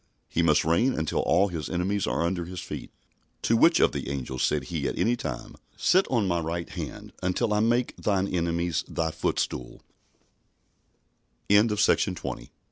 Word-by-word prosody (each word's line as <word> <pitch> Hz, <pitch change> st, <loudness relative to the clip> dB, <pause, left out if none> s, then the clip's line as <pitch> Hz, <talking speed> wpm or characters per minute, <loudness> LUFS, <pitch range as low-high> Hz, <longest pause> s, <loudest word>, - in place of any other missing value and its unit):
He 85 Hz, -, 0 dB
must 80 Hz, -3 st, +3 dB
reign 100 Hz, +11 st, +2 dB
until 80 Hz, -1 st, -1 dB
all 100 Hz, +1 st, +3 dB
His 80 Hz, -4 st, -5 dB
enemies 95 Hz, +3 st, -1 dB
are -, -, 0 dB
under 85 Hz, 0 st, -1 dB
His 90 Hz, +1 st, -7 dB
feet. -, -, -7 dB, 0.5 s
"To 115 Hz, -, +3 dB
which 165 Hz, +9 st, +5 dB
of -, -, +4 dB
the -, -, -4 dB
angels 65 Hz, -2 st, -4 dB
said 75 Hz, -2 st, +1 dB
he -, -, -3 dB
at -, -, -3 dB
any 120 Hz, +2 st, +2 dB
time, 75 Hz, -, -6 dB, 0.2 s
Sit 185 Hz, +2 st, +3 dB
on 115 Hz, -6 st, +1 dB
my 85 Hz, -1 st, +1 dB
right 85 Hz, +1 st, -3 dB
hand, -, -, -7 dB
until 105 Hz, +5 st, 0 dB
I 105 Hz, -, +2 dB
make 120 Hz, +3 st, +1 dB
thine 100 Hz, -2 st, 0 dB
enemies 85 Hz, -2 st, -1 dB
thy 80 Hz, -1 st, -1 dB
footstool?" 75 Hz, -5 st, -3 dB
85 Hz, 155 wpm, -27 LUFS, 80-105 Hz, 0.5 s, which